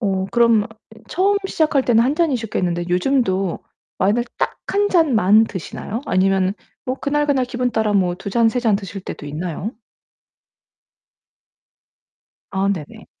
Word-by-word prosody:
어 190 -3 0
그럼 235 -3 +4
어 - - -7 0.4
처음 395 +3 +2
시작할 305 -7 +1
때는 230 -2 +4
1 270 +4 +1
잔이셨겠는데 220 - -1
요즘도 190 -2 +1 0.4
와인을 210 +6 +2
딱 - - 0 0.2
1 410 0 +2
잔만 225 - +4
드시나요? 210 +3 -6
아니면은 190 -2 +2 0.3
뭐 255 +1 -2
그날 295 +1 0
그날 270 -3 +2
기분따라 240 -4 -1 0.3
2 195 +1 -6
잔, 230 +2 +3
3 245 - -1
잔 230 -4 +2
드실 195 0 -4
때도 180 - -8
있나요? 165 +6 -4 2.8
아 195 0 0
네네. 160 -7 -8
220 Hz, 250 characters per minute, -20 LUFS, 190-255 Hz, 2.8 s, 그럼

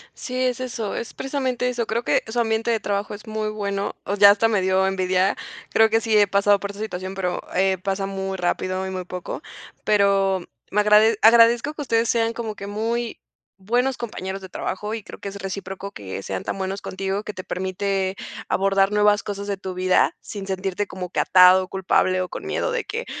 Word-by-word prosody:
Sí, 255 -3 -6
es 250 -1 0
eso. 235 -4 -4
Es 235 - -5
precisamente 260 -2 -1
eso. 240 -2 -2
Creo 230 +2 -1
que, - - +2
su 230 +2 -2
ambiente 225 0 +1
de 225 - +1
trabajo 205 0 -2
es 205 +2 -10
muy 215 0 -2
bueno, 200 -1 -3
o 200 - -1
ya, 200 0 +8
hasta 210 +2 +3
medio 190 -3 +2
envidia. 185 0 +1 0.4
Creo 225 0 +5
que 225 +1 +2
sí 220 -2 +2
he 205 -1 +5
pasado 200 +1 +3
por 200 0 -4
esta 200 +1 -10
situación, 185 -2 -5
pero, 180 -2 -2
eh, 190 0 +2
pasa 195 +1 -2
muy 195 0 -4
rápido, 185 +1 -1
y - - -4
muy 185 -1 -4
poco, 180 0 -6 0.4
pero, 195 -2 +3 0.3
me 210 - +3
agrade 210 +1 +5
agradezco 235 +5 +6
que 305 - -7
ustedes, 230 -4 +1
sean 230 -1 +1
como 225 -2 -5
que 200 - -7
muy 225 +3 -2 0.4
buenos 245 +6 +1
compañeros 195 -4 -5
de 190 - -8
trabajo, 210 +4 -4
y 225 -2 -5
creo - - -11
que - - -7
es 195 - -10
recíproco, 195 0 -6
que 95 - -7
sean 95 -1 -4
tan - - -3
buenos 195 +1 -3
contigo, 195 +2 -3
que 210 - -6
te 185 - -7
permite 190 +1 -2 0.3
abordar, 195 0 +2
nuevas 210 0 +4
cosas 200 0 -5
de 200 - -2
tu 190 -1 -6
vida, 185 0 +2
sin 200 -2 -7
sentirte 190 +1 -2
como 180 -1 -6
que - - -2
atado, 185 0 +6
culpable, 185 -1 +1
o 180 - -3
con - - -7
miedo - - -1
de 480 -2 -2
que: 460 +4 -4
200 Hz, 205 wpm, -23 LUFS, 190-225 Hz, 0.4 s, ya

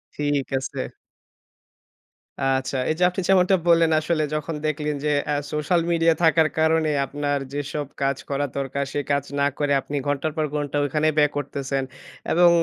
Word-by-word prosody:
ঠিক 145 -2 0
আছে। 130 - -4 1.6
আচ্ছা, 135 0 0
এই 155 - +1
যে - - +3
আপনি 180 +2 -3
যেমনটা 190 0 +5
বললেন, 165 -1 +5
আসলে 155 0 0
যখন 155 +1 -3
দেখলেন 150 -1 -1
যে 150 - +2 0.2
আ - - +2 0.2
সোশ্যাল 150 +3 +1
মিডিয়া 165 -1 +4
থাকার 160 -1 +5
কারণে 160 0 +3 0.2
আপনার 145 +1 -2
যেসব 145 +1 -3 0.2
কাজ 135 0 +1
করা 145 0 0
দরকার, 140 0 -2
সে - - 0
কাজ 140 -1 +2 0.2
না 140 - +3
করে 145 -1 0
আপনি 145 - -6
ঘন্টার 145 +2 0
পর 155 - +1
ঘন্টা 145 -1 -2
ওখানেই 155 +2 +1
ব্যয় 150 -1 +4
করতেছেন। 140 -1 -2 0.5
এবং 175 +1 +6
150 Hz, 160 wpm, -23 LUFS, 140-160 Hz, 1.6 s, এবং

